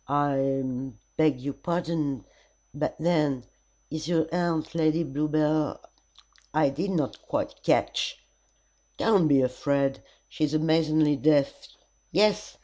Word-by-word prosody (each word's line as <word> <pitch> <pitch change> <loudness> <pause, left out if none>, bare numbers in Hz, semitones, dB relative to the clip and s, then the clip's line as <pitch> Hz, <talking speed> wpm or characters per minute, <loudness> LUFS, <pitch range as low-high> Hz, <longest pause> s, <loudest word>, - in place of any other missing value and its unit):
"I 135 -1 +1 0.5
beg 155 -5 +2
your 140 +1 -3
pardon 160 - -2 0.5
but 150 +2 -2
then 150 -6 +1 0.5
is 155 0 -4
your 165 -2 +1
aunt 170 -3 -1
Lady 160 0 +2
Bluebell? 150 +1 0 0.8
I 155 -2 +4
did 165 +9 -3
not 160 -8 -2
quite - - -3
catch - - 0 0.3
" - - -39
"Don't 200 -7 +3
be 140 -3 +4
afraid. 135 +1 0 0.3
She 155 - -4
is 150 +1 -2
amazingly 155 -1 +3
deaf. 145 -1 +3 0.6
Yes. 210 +3 +2
155 Hz, 120 wpm, -27 LUFS, 140-165 Hz, 0.8 s, I